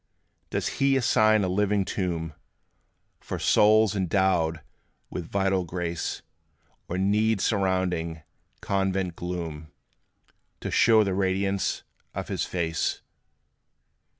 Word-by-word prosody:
Does - - -1
He 135 0 +4
assign 110 -3 +3
a - - +1
living 100 +1 +1
tomb 85 -5 -3 0.9
For - - -5
souls, 110 0 +4
endowed 90 -4 +1 0.5
with 85 -2 -5
vital 95 -1 +1
grace; 85 -1 -4 0.6
Or 90 - -3
need 105 +3 +2
surrounding 95 -6 0 0.4
convent 95 -2 -1
gloom, 80 -4 -5 0.9
To - - -4
show 110 -2 +5
the 100 -2 -1
radiance 95 +1 0 0.3
of - - -4
his - - -1
face? 80 -2 -2
95 Hz, 100 wpm, -26 LUFS, 85-100 Hz, 0.9 s, show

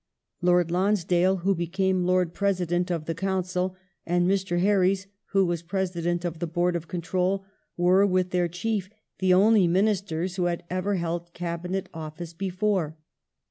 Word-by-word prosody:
Lord 175 -1 +3
Lonsdale 185 -1 +2
who 195 - +4
became 185 +1 0
Lord 180 -2 +2
President 180 -3 0
of 165 -3 -2
the 165 - -2
Council 185 +1 -1 0.3
and 175 +1 +1
Mr. 190 -2 +1
Herries 190 0 +2 0.2
who 195 -2 +2
was 170 -2 -1
President 175 -1 -2
of 170 -2 -3
the 170 - -2
Board 175 +2 0
of 170 -1 -4
Control 185 +3 -1 0.3
were 180 +3 +4
with 185 -1 +1
their 180 -1 +2
Chief 190 +3 -2 0.3
the 185 -1 +3
only 200 +1 +5
Ministei 190 -2 +1
s 180 -1 -6
who 180 - +1
had 175 -1 -1
ever 185 +2 0
held 170 -1 -3
Cabinet 175 +2 -3
office 160 +1 -7
before. 185 -3 -1
180 Hz, 155 wpm, -26 LUFS, 175-190 Hz, 0.3 s, only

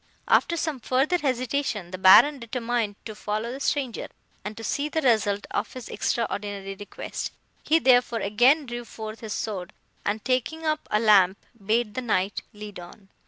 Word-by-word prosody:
"After 340 - +3
some 315 -4 -2
further 270 +9 +1
hesitation, 255 - -1
the 185 - -6
Baron 270 +10 +7
determined 235 -3 -2
to 220 - -6
follow 215 +2 -3
the 265 - -6
stranger, 275 -4 -1 0.4
and 210 +2 -6
to 225 - -7
see 285 +7 -1
the 315 +1 -1
result 210 -5 +2
of - - -2
his 255 -3 -8
extraordinary 205 -4 -2
request; 205 +1 -6 0.3
he, 315 - +3
therefore, 245 -5 +4
again 245 +10 +4
drew 240 -1 -5
forth 220 -1 -8
his 220 -2 -5
sword, 190 -5 -4 0.3
and, 210 +2 -2
taking 260 +6 -1
up 310 0 -1
a 210 - +2
lamp, 200 -4 +5 0.3
bade 215 +1 +1
the 255 - -3
Knight 205 -4 0
lead 210 -2 -9
on. 195 +3 -13
230 Hz, 165 wpm, -25 LUFS, 205-260 Hz, 0.4 s, Baron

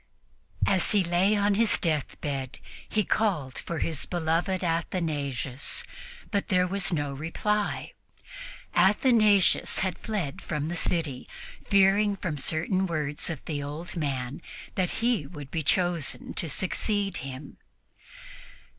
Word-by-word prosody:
As 190 0 +3
he 205 -2 +4
lay 180 +4 +3
on 205 0 +3
his 220 +1 +4
deathbed 140 -4 -2 0.3
he 215 - +2
called 175 - 0
for 170 - -4
his 160 -2 -2
beloved 175 +2 0
Athanasius, 150 -6 -1 0.5
but 200 -2 0
there 180 -1 +3
was 195 +1 0
no 145 -4 -1
reply. 200 +8 -1 0.8
Athanasius 205 +1 +4
had 185 -2 -3
fled 200 -11 -3
from 150 +1 -3
the 175 - -3
city, 160 -7 -1 0.4
fearing 200 +1 +4
from 170 -6 -3
certain 180 +6 0
words 150 -3 -2
of 160 -5 -5
the 150 -3 -3
old 150 +6 -6
man 140 -3 -2 0.3
that 185 -2 0 0.2
he 230 - +2
would 145 -4 -9
be 160 - -1
chosen 175 -1 +1
to 165 - +2
succeed 195 +3 0
him. 135 +2 -8
170 Hz, 125 wpm, -27 LUFS, 145-195 Hz, 0.8 s, he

